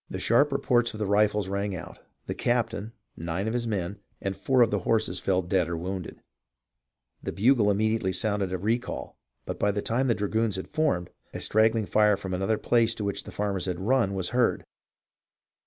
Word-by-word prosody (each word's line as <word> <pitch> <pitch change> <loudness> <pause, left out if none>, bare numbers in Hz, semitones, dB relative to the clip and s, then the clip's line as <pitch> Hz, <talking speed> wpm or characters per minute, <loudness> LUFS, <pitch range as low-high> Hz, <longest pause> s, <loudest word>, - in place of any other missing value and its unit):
The - - -4
sharp 140 +6 +3
reports 120 -4 +1
of - - -8
the 105 - 0
rifles 105 0 +2
rang 100 0 -2
out; 85 - -9 0.3
the - - -3
captain, 115 -2 -1 0.2
nine 85 +5 -3
of 110 - -1
his 120 -1 -1
men, 100 -2 -3 0.2
and 95 0 -3
four 130 +3 +3
of 115 - +1
his 105 -2 0
horses 110 -4 0
fell 95 +1 +1
dead 90 -1 +1
or 85 - -2
wounded. 90 +1 -5 1.0
The - - -4
bugle 110 0 +3
immediately 110 -1 +1
sounded 100 0 0
a 95 - -1
recall, 110 +6 -3 0.3
but - - -5
by 105 - +2
the 100 0 -1
time 125 +4 +1
the 115 - +3
dragoons 110 +1 0
had 95 - -5
formed, 150 - 0 0.2
a - - -3
straggling 110 0 +3
fire 105 0 +3
from 95 -2 -5
another 95 +4 0
place 115 0 +2
to 105 - -5
which 100 -1 -3
the - - -8
farmers 100 -3 -2
had 90 -2 -2
run 110 -1 +1
was 95 -2 -1
heard. 120 0 +1
105 Hz, 195 wpm, -27 LUFS, 95-115 Hz, 1.0 s, sharp